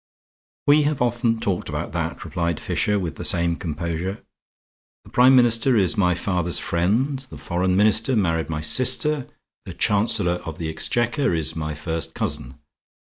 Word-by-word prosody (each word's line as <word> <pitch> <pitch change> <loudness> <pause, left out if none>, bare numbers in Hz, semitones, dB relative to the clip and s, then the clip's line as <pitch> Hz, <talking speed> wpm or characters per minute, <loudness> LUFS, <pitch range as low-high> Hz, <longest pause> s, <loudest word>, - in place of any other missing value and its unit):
"We 145 +1 +5
have 150 -1 0
often 120 -1 +1
talked 95 -5 -2
about - - -4
that," - - -4
replied 85 -2 -2
Fisher, 105 0 0
with 90 -4 -4
the - - -6
same 85 -1 +1
composure. 85 +3 -4 0.8
"The - - -17
Prime 130 +2 +6
Minister 120 0 +4
is 95 0 +2
my 90 -4 +2
father's 90 -2 -1
friend. 115 +12 0
The - - -10
Foreign 90 +1 -1
Minister 110 +5 +3
married 80 -6 0
my 75 -2 -3
sister. 130 - +2 0.4
The - - -8
Chancellor 100 -4 +1
of 80 -2 -7
the 80 -2 -4
Exchequer 120 - 0
is 80 -4 -2
my 75 -1 -4
first 80 +2 -5
cousin. - - -3
95 Hz, 155 wpm, -22 LUFS, 85-120 Hz, 0.8 s, Prime